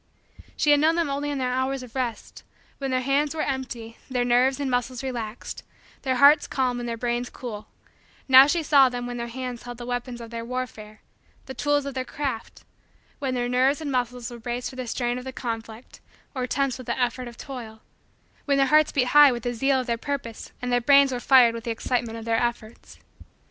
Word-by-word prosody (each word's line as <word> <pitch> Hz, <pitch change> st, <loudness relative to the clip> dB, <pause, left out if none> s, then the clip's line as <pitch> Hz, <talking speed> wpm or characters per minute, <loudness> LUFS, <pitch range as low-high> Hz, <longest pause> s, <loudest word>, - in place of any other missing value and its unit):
She 295 Hz, -, +3 dB
had 290 Hz, -, +6 dB
known 320 Hz, +2 st, +3 dB
them 335 Hz, -4 st, 0 dB
only 285 Hz, +1 st, -2 dB
in 290 Hz, -, -2 dB
their 255 Hz, -1 st, -1 dB
hours 260 Hz, +1 st, -1 dB
of 245 Hz, -2 st, -12 dB
rest 250 Hz, -4 st, -4 dB, 0.4 s
when 270 Hz, -1 st, -3 dB
their 255 Hz, 0 st, +1 dB
hands 280 Hz, +3 st, +1 dB
were 310 Hz, -, -1 dB
empty, 245 Hz, -4 st, -5 dB
their 250 Hz, -2 st, 0 dB
nerves 250 Hz, +3 st, +3 dB
and 275 Hz, -2 st, -2 dB
muscles 245 Hz, 0 st, -1 dB
relaxed, 240 Hz, -4 st, -5 dB, 0.4 s
their 260 Hz, -1 st, 0 dB
hearts 285 Hz, +4 st, +6 dB
calm 255 Hz, -2 st, -1 dB
and 240 Hz, 0 st, -4 dB
their 230 Hz, -, -3 dB
brains 240 Hz, +1 st, -2 dB
cool; 215 Hz, -4 st, -8 dB, 0.6 s
now 265 Hz, +1 st, +9 dB
she 335 Hz, +2 st, 0 dB
saw 280 Hz, -3 st, +6 dB
them 245 Hz, -1 st, -5 dB
when 245 Hz, 0 st, -5 dB
their 235 Hz, 0 st, -4 dB
hands 250 Hz, 0 st, -6 dB
held 245 Hz, -1 st, -8 dB
the 240 Hz, -, -7 dB
weapons 245 Hz, 0 st, -4 dB
of 230 Hz, -1 st, -9 dB
their 230 Hz, 0 st, -5 dB
warfare 230 Hz, -4 st, -6 dB, 0.4 s
the 265 Hz, -, -7 dB
tools 290 Hz, +2 st, 0 dB
of 280 Hz, -, -4 dB
their 260 Hz, 0 st, -2 dB
craft 260 Hz, -3 st, -5 dB, 0.6 s
when 265 Hz, -3 st, -2 dB
their 245 Hz, -1 st, -1 dB
nerves 260 Hz, +4 st, +2 dB
and 300 Hz, -3 st, -4 dB
muscles 250 Hz, -1 st, -2 dB
were 240 Hz, -, -9 dB
braced 240 Hz, +3 st, -4 dB
for -, -, -12 dB
the 255 Hz, -1 st, -5 dB
strain 240 Hz, +1 st, -1 dB
of -, -, -9 dB
the 260 Hz, -, -6 dB
conflict 230 Hz, -1 st, -7 dB, 0.3 s
or 255 Hz, -2 st, -2 dB
tense 270 Hz, 0 st, -1 dB
with 255 Hz, -, -10 dB
the 235 Hz, -, -2 dB
effort 250 Hz, 0 st, -1 dB
of 235 Hz, 0 st, -11 dB
toil; 230 Hz, -5 st, -9 dB, 0.6 s
when 280 Hz, -1 st, +2 dB
their 275 Hz, -, +4 dB
hearts 305 Hz, +2 st, +4 dB
beat 250 Hz, -3 st, +1 dB
high 295 Hz, 0 st, +8 dB
with 240 Hz, -2 st, -4 dB
the 245 Hz, -, -2 dB
zeal 270 Hz, +3 st, +2 dB
of -, -, -7 dB
their 235 Hz, -2 st, -2 dB
purpose 265 Hz, -6 st, -5 dB
and 250 Hz, -, -2 dB
their 245 Hz, -, +3 dB
brains 280 Hz, +2 st, +5 dB
were 250 Hz, -, -2 dB
fired 245 Hz, -2 st, +6 dB
with 230 Hz, -1 st, -6 dB
the -, -, -3 dB
excitement 230 Hz, 0 st, -2 dB
of 225 Hz, -, -8 dB
their 225 Hz, 0 st, +1 dB
efforts. 235 Hz, -2 st, -4 dB
250 Hz, 220 wpm, -25 LUFS, 240-270 Hz, 0.6 s, now